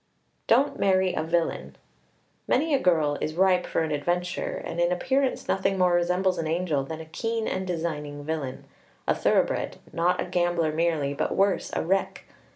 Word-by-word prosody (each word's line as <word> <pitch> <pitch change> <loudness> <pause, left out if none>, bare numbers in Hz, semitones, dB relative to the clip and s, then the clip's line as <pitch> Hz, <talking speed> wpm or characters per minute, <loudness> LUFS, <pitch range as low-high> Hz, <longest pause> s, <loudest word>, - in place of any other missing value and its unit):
Don't 270 +5 +3
marry 190 -1 +3
a - - -1
villain. 160 - -1 0.7
Many 310 +4 +2
a 275 - +4
girl 155 - +2
is 155 - -2
ripe 185 0 +3
for - - 0
an 160 - -3
adventure, 175 +5 -1
and 170 - -5
in 175 0 +2
appearance 265 +9 0
nothing 195 0 +1
more 180 -1 +3
resembles 180 +2 +1
an 160 - -2
angel 160 -4 0
than 160 +3 -6
a - - -9
keen 225 +7 -3
and 185 0 -2
designing 150 -4 -3
villain 150 -5 -4 0.4
a - - +4
thoroughbred; - - +1 0.2
not 175 +2 +1
a - - -1
gambler 175 -3 +1
merely, 155 -3 0
but - - -2
worse, 195 0 +2
a - - -1
wreck! 195 +3 0
175 Hz, 170 wpm, -26 LUFS, 160-185 Hz, 0.7 s, a